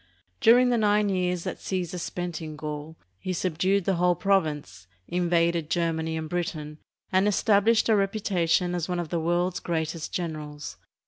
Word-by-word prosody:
During 245 +2 +6
the 240 -1 +2
nine 210 -1 +3
years 180 -2 0
that - - -4
Caesar 180 -2 -3
spent 175 -1 -4
in 155 -1 -6
Gaul 150 +1 -6 0.2
he 185 - -3
sub 175 -2 -2
dued 195 0 +2
the 190 -3 +1
whole 180 0 +3
province, 155 - 0 0.2
invaded 170 -2 +1
Germany 160 -2 0
and 160 0 -4
Britain, 155 -3 -4 0.3
and 190 +2 +3
established 215 +2 +3
a 220 - +4
reputation 195 -4 +1
as 175 0 -2
one 180 -1 -1
of 170 -3 -4
the 170 - -1
world's 175 +2 0
greatest 160 -1 -3
generals. 150 -4 -5
175 Hz, 160 wpm, -26 LUFS, 160-190 Hz, 0.3 s, During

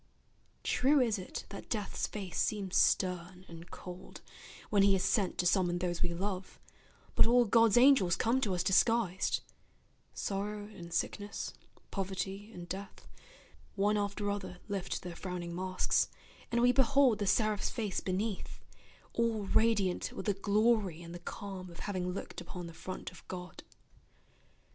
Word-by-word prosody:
True 275 +3 +3
is 225 -5 +2
it 185 - -6
that 200 - -9
Death's 210 -3 -2
face 195 -5 -5
seems 200 -3 -1
stern 180 0 +2
and 170 +1 -11
cold, 180 +1 -9 0.5
When 205 -2 +5
he 195 0 +6
is 190 - 0
sent 195 -2 +1
to 180 - 0
summon 175 -1 +3
those 175 -1 -2
we 175 - +1
love, 185 +1 -4 0.5
But - - +5
all 240 +1 +5
God's 230 +1 +5
angels 240 -9 +6
come 245 +4 +1
to 200 -7 +1
us 175 - 0
disguised; 195 0 +2 0.7
Sorrow 205 +1 -3
and 175 -5 -10
sickness, 205 +4 -2 0.4
poverty 195 +1 -3
and 175 -4 -9
death, 195 +2 -7 0.7
One 205 +1 +2
after 205 0 -1
other 200 -3 -5
lift 200 -3 -3
their 175 -1 -6
frowning 180 -2 -5
masks, 185 +1 +1 0.4
And 235 0 +2
we 245 - +7
behold 265 -2 +4
the 205 - -1
seraph's 215 0 +2
face 215 -5 -2
beneath, 195 +2 -3 0.5
All 230 -2 +1
radiant 200 -2 +2
with - - -6
the 205 - +2
glory 200 -3 +2
and 170 0 -9
the 175 - -7
calm 185 +1 -7
Of 170 - -10
having 185 -3 -2
looked 180 - -5
upon 180 -1 -7
the 170 - -8
front 185 +3 -6
of 180 - -16
God. 180 -1 -7
195 Hz, 155 wpm, -32 LUFS, 180-215 Hz, 0.7 s, we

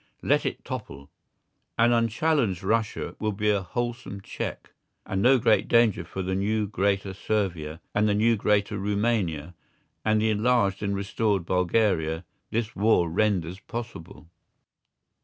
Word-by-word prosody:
Let - - +2
it - - -5
topple. 70 0 -7 0.7
An 120 +1 +4
unchallenged 115 - +1
Russia 110 +2 -1
will 110 -1 -1
be 105 +1 +1
a 100 -1 +1
wholesome 120 0 -4
check, - - -6 0.3
and 95 0 -2
no 130 +4 +6
great 110 -2 +3
danger 115 -6 +3
for 95 +3 -5
the 95 +1 -2
new 105 +3 0
greater 100 -1 0
Servia 90 -7 -2
and 105 +1 +2
the 100 - +2
new 115 +2 +3
greater 105 0 +1
Rumania 100 -6 -1 0.5
and 110 0 +2
the 110 0 +2
enlarged 105 -2 +2
and 100 -1 -1
restored 100 -1 0
Bulgaria 90 -3 +1 0.2
this 110 -1 -2
war 100 -5 +3
renders 95 -2 0
possible. 115 -7 -8
105 Hz, 140 wpm, -26 LUFS, 95-110 Hz, 0.7 s, no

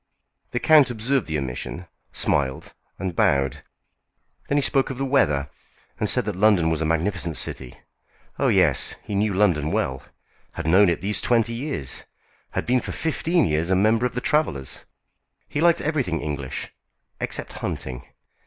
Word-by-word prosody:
The 120 - -2
count 155 -3 +6
observed 120 +3 0
the 80 -1 -1
omission, 70 +6 -5 0.3
smiled, 65 -2 -1 0.2
and 95 -3 -4
bowed. 70 -4 +2 0.9
Then 145 - +1
he - - +4
spoke 135 0 +2
of 135 - -5
the 135 - -1
weather, 75 - +2 0.5
and - - +1
said - - +3
that 105 -3 -3
London 95 -5 +4
was 80 -1 -1
a - - +1
magnificent 85 +1 -1
city. 65 -2 -4 0.6
Oh, - - +2
yes, - - +2
he - - -6
knew 105 +1 +1
London 85 -7 +2
well, 65 0 -1 0.5
had 85 - -5
known 95 +4 +5
it 85 0 -1
these 105 +2 -1
twenty 115 -1 +2
years; 120 - -3 0.5
had - - -2
been 125 0 +2
for - - -5
fifteen 165 +2 +1
years 80 +2 0
a 95 - +3
member 110 +5 +3
of 120 - -12
the 125 - -1
Travellers'; 70 - 0 0.7
he 145 - -2
liked 170 0 +4
everything 135 - -1
English, 70 -2 -5 0.5
except - - -4
hunting. 65 -2 -4
95 Hz, 160 wpm, -24 LUFS, 75-125 Hz, 0.9 s, count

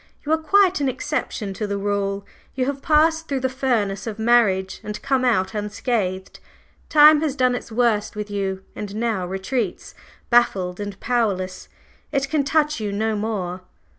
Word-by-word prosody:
"You 300 - -2
are 320 - +4
quite 375 +1 +3
an 275 - +2
exception 250 -7 -3
to 210 +2 -3
the 200 0 -2
rule. 200 0 -2 0.3
You 255 -1 0
have 275 0 -3
passed 320 +2 +3
through 275 -2 -2
the 260 - +1
furnace 230 -6 -1
of 215 -2 -4
marriage 220 -5 +2
and 210 0 -5
come 265 -2 +1
out 225 -6 +1
unscathed. 205 -3 -2 0.5
Time 305 0 +7
has 300 -4 -1
done 255 -2 +2
its 245 - -5
worst 220 -3 +1
with 210 0 -5
you, 190 -1 -2
and 205 -1 -6
now 220 -5 -1
retreats, 195 +3 -3 0.4
baffled 190 -7 +2
and 205 -1 -6
powerless; 200 -7 -1 0.4
it 275 -1 0
can 305 -3 +2
touch 300 0 +1
you 210 -2 -3
no 220 +2 0
more!" 195 -4 -3
220 Hz, 165 wpm, -22 LUFS, 200-270 Hz, 0.5 s, Time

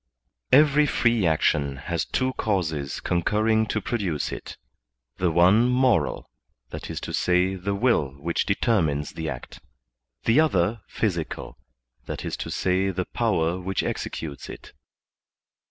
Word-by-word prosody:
Every 150 +1 +6
free 115 -8 +2
action 75 -3 +1
has 80 +4 -3
two 130 0 -1
causes 80 - -2
concurring 110 +5 +1
to 105 - -1
produce 95 -9 -2
it; - - -7 0.6
the 90 -1 +1
one 95 +9 +5
moral, 125 - +2 0.4
viz, - - -5
the 95 +2 0
will 115 - +2
which 85 +4 -1
determines 85 - +1
the 80 -1 -4
act; - - -8 0.6
the 115 +6 +4
other 110 - +2
physical, 85 -8 -3 0.5
viz, - - -4
the 95 0 -1
power 90 -7 +1
which 95 +1 -2
executes 75 -4 -5
it. - - -10
95 Hz, 110 wpm, -25 LUFS, 80-115 Hz, 0.6 s, Every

